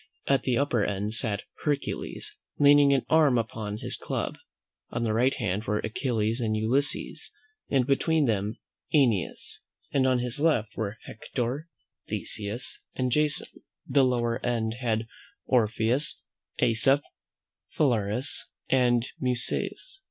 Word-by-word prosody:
At 135 Hz, -2 st, +3 dB
the 125 Hz, -2 st, 0 dB
upper 130 Hz, -6 st, +1 dB
end 100 Hz, +1 st, -2 dB
sat 110 Hz, -3 st, 0 dB, 0.2 s
Hercules, 145 Hz, -2 st, -1 dB, 0.2 s
leaning 145 Hz, -1 st, +6 dB
an 135 Hz, -, +2 dB
arm 155 Hz, -6 st, +4 dB
upon 110 Hz, -2 st, -3 dB
his -, -, +1 dB
club; -, -, -3 dB, 0.5 s
on 115 Hz, -, -2 dB
his 110 Hz, -, +1 dB
right 125 Hz, +5 st, +2 dB
hand 105 Hz, -3 st, -2 dB
were 105 Hz, +1 st, 0 dB
Achilles 110 Hz, +1 st, -1 dB
and 110 Hz, -2 st, 0 dB
Ulysses, 125 Hz, +6 st, +1 dB, 0.4 s
and 130 Hz, -3 st, +2 dB
between 150 Hz, +3 st, +2 dB
them 105 Hz, -2 st, -1 dB, 0.4 s
AEneas; 115 Hz, -, +1 dB, 0.3 s
on 130 Hz, -2 st, +3 dB
his 125 Hz, +3 st, -1 dB
left 120 Hz, -9 st, +1 dB
were 110 Hz, 0 st, -3 dB
Hector, 125 Hz, +7 st, -4 dB, 0.4 s
Theseus, 105 Hz, +4 st, -3 dB, 0.2 s
and 130 Hz, -1 st, 0 dB
Jason: 150 Hz, +2 st, +1 dB, 0.2 s
the 140 Hz, +1 st, +3 dB
lower 120 Hz, -1 st, 0 dB
end 115 Hz, -2 st, -1 dB
had 115 Hz, -2 st, 0 dB, 0.4 s
Orpheus, 120 Hz, +3 st, +1 dB, 0.4 s
AEsop, 125 Hz, +4 st, +3 dB, 0.7 s
Phalaris, 120 Hz, -3 st, 0 dB, 0.2 s
and 120 Hz, -2 st, +3 dB
Musaeus. 130 Hz, -, -2 dB
120 Hz, 120 wpm, -27 LUFS, 110-135 Hz, 0.7 s, leaning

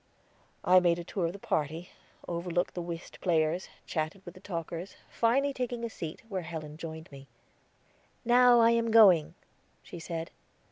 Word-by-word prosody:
I 185 Hz, 0 st, +7 dB
made 175 Hz, -2 st, +2 dB
the 175 Hz, -, -5 dB
tour 175 Hz, 0 st, -2 dB
of 165 Hz, -, -5 dB
the -, -, -8 dB
party, 160 Hz, -1 st, -2 dB, 0.4 s
overlooked 175 Hz, +1 st, -2 dB
the 175 Hz, -, -4 dB
whist 170 Hz, -1 st, -8 dB
players, 165 Hz, 0 st, +1 dB, 0.2 s
chatted 160 Hz, +4 st, -4 dB
with 175 Hz, -, -9 dB
the -, -, -14 dB
talkers, 170 Hz, -1 st, -6 dB, 0.2 s
finally 270 Hz, +5 st, +2 dB
taking 245 Hz, -2 st, -3 dB
a 230 Hz, -, -5 dB
seat, 165 Hz, -6 st, -7 dB
where 195 Hz, -4 st, -3 dB
Helen 160 Hz, -3 st, -7 dB
joined 160 Hz, 0 st, -8 dB
me. 135 Hz, 0 st, -12 dB, 1.0 s
"Now 245 Hz, 0 st, +6 dB
I 230 Hz, 0 st, +6 dB
am 230 Hz, 0 st, +1 dB
going," 180 Hz, -8 st, +6 dB, 0.5 s
she 175 Hz, -, -9 dB
said. 165 Hz, 0 st, -5 dB
175 Hz, 160 wpm, -30 LUFS, 165-220 Hz, 1.0 s, I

